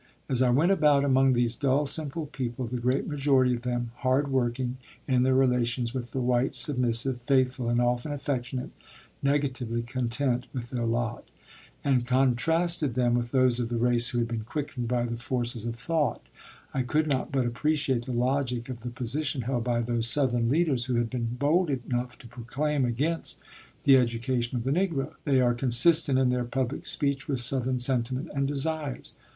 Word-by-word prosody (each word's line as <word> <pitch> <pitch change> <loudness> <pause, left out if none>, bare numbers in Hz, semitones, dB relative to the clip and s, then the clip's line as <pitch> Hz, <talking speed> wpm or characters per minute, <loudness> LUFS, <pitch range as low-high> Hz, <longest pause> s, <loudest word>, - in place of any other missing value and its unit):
As 130 -1 0
I 130 - +4
went 150 +10 +3
about 145 -6 +4
among 135 -1 +4
these 120 -1 +1
dull, 140 +3 +1
simple 155 +2 -4
people 130 -3 -4
the 125 +1 -4
great 125 +3 0
majority 135 -3 +2
of 120 - -3
them 120 -1 -2
hard 135 +3 +1
working, 125 -1 -1 0.3
in 130 -2 +2
their 130 +1 +3
relations 125 -2 +1
with 125 -2 -4
the 130 - -4
whites 125 +2 +1
submissive, 125 -1 +1
faithful, 130 -1 +1
and 120 0 +2
often 120 +4 0
affectionate, 130 -3 -3 0.5
negatively 130 -5 -1
content 125 +1 -1
with 120 -2 -6
their 120 -3 -1
lot 120 +1 -2 0.6
and 130 -3 +2
contrasted 135 +3 +1
them 120 -1 +2
with 120 0 0
those 130 -2 +2
of 120 -2 -2
the 120 - -2
race 120 0 +3
who 120 - -3
had 120 -1 +1
been 115 -2 -4
quickened 135 -1 -4
by 120 0 0
the 120 0 -4
forces 120 -1 -2
of 115 - -3
thought, 155 +5 -1 0.5
I 135 - 0
could 150 +5 +1
not 135 -3 -1
but 135 -3 +1
appreciate 130 0 0
the 130 - -5
logic 125 0 -1
of 120 -2 -6
the 120 - -5
position 130 +3 -3
held 120 -1 -1
by 120 -1 +1
those 120 -1 0
Southern 120 -4 +2
leaders 140 -4 +1
who 125 -1 -1
have 120 -1 0
been 120 -2 -2
bold 160 +4 +2
enough 125 -2 -3
to 120 - -13
proclaim 130 +4 -2
against 145 +8 -1 0.5
the 135 -1 +7
education 120 0 0
of 115 - -3
the 135 - -1
Negro. 155 -4 0
They 135 -3 +3
are 120 -1 +3
consistent 135 +4 +4
in 130 -1 +3
their 125 -1 0
public 130 +2 -3
speech 140 -1 0
with 135 -3 0
Southern 130 +1 0
sentiment 125 +3 -1
and 140 -1 0
desires. 145 -1 -2
125 Hz, 180 wpm, -27 LUFS, 120-140 Hz, 0.6 s, the